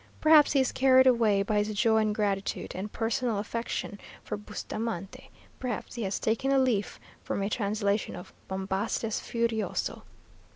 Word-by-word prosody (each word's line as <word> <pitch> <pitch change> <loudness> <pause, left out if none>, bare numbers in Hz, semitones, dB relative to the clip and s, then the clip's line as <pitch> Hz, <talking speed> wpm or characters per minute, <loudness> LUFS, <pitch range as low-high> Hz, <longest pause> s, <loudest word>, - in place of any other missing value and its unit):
Perhaps 310 -2 +6
he 280 - +4
is 260 - +2
carried 260 0 +5
away 225 -6 +4
by 210 +1 +1
his 210 0 -3
joy 220 +1 +3
and 215 -1 +1
gratitude, 200 -2 -1
and 200 +3 -5
personal 230 0 -1
affection 210 -1 -4 0.2
for - - -4
Bustamante 210 -1 -6 0.3
perhaps 250 -4 -4
he 235 - -5
has 195 -2 -2
taken 230 +5 0
a 275 - +4
leaf 245 -7 +1 0.2
from 200 - -2
a 200 - -1
translation 205 -1 -1
of 180 - -10
Bombastes 195 +3 -2
Furioso. 230 -2 -2
215 Hz, 155 wpm, -28 LUFS, 200-235 Hz, 0.3 s, Perhaps